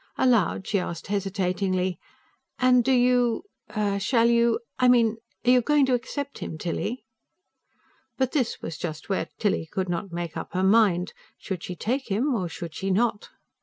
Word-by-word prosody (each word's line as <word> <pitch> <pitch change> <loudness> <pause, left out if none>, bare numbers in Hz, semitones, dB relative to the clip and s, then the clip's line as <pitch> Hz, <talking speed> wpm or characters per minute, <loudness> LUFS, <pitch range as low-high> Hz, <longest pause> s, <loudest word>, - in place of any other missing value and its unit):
Aloud, 230 -7 +2
she 200 - +1
asked 170 -2 -5
hesitatingly: 185 -2 -1 0.6
"And 250 -1 +4
do 265 - +1
you... 245 -2 +3 0.6
shall 230 +3 +2
you... 235 - +3 0.2
I 255 - +4
mean, 230 -3 +4 0.3
are 245 - +6
you 250 -1 +6
going 295 +3 +3
to 260 - +1
accept 280 +3 -3
him, 160 - -5
Tilly?" 200 +8 -3 1.1
But 260 -1 +1
this 260 -6 -1
was 160 -2 -5
just 155 0 -5
where 195 - -1
Tilly 195 -6 0
could 190 -1 -2
not 175 +2 -3
make 170 -1 -4
up - - -6
her 185 +1 0
mind: 190 -3 +3 0.2
should 190 -4 -5
she 180 - -6
take 255 - -2
him, 245 +8 +1
or 185 -7 -1
should 165 0 -7
she 190 +5 -3
not? 205 +2 0
210 Hz, 165 wpm, -26 LUFS, 185-245 Hz, 1.1 s, are